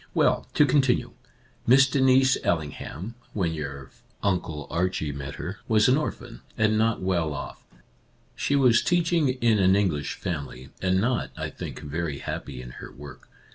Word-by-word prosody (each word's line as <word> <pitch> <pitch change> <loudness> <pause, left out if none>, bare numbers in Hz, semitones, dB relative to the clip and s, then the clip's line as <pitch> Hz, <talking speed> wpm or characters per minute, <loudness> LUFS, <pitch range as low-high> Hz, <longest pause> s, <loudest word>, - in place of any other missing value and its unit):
" - - -34
Well, - - +2
to 150 - +6
continue: 130 -2 +2 0.6
Miss 135 +3 +7
Denise 130 -1 +4
Ailing 80 -3 0
ham, 95 +10 -7 0.2
when 90 -6 0
your 70 -3 -6 0.3
Uncle 85 -7 -1
Archie 85 -3 -1
met 70 -1 -6
her, 95 +3 -6
was 110 -1 +4
an 130 - +5
orphan, 120 -5 -4 0.2
and 110 0 +3
not 110 -2 +1
well 85 -5 0
off. 70 - -7 0.7
She 140 - 0
was 125 -5 +5
teaching 170 -4 +2
in 120 -4 +2
an 95 0 +5
English 85 -8 0
family, 65 -7 -5
and 95 0 +2
not, 120 +4 0
I - - -4
think, - - -7
very 75 0 -3
happy 60 - -6
in 60 - -9
her - - -9
work. 70 0 -12
95 Hz, 165 wpm, -26 LUFS, 75-125 Hz, 0.7 s, Miss